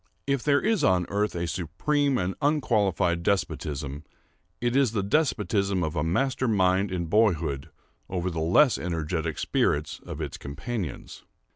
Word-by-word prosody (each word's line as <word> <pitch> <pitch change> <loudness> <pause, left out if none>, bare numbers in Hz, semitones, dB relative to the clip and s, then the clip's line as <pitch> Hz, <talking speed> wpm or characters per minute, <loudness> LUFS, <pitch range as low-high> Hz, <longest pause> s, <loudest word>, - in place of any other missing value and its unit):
If 140 -2 0
there 145 +1 +3
is 215 -6 +1
on 90 -6 +3
earth 105 0 0
a 85 0 -1
supreme 130 - 0
and 90 +1 -1
unqualified 105 - +1
despotism, 75 -6 -2 0.6
it 120 +1 0
is 135 -5 +3
the 100 -3 0
despotism 100 - +1
of 80 0 -2
a 75 - 0
master 130 +10 0
mind 95 -2 +2
in 90 -2 -2
boyhood 80 -7 +1 0.4
over 90 0 -2
the 85 - -3
less 115 - +4
energetic 80 -1 -2
spirits 75 +1 0
of - - -7
its - - -4
companions. 85 - -6
95 Hz, 145 wpm, -26 LUFS, 85-120 Hz, 0.6 s, less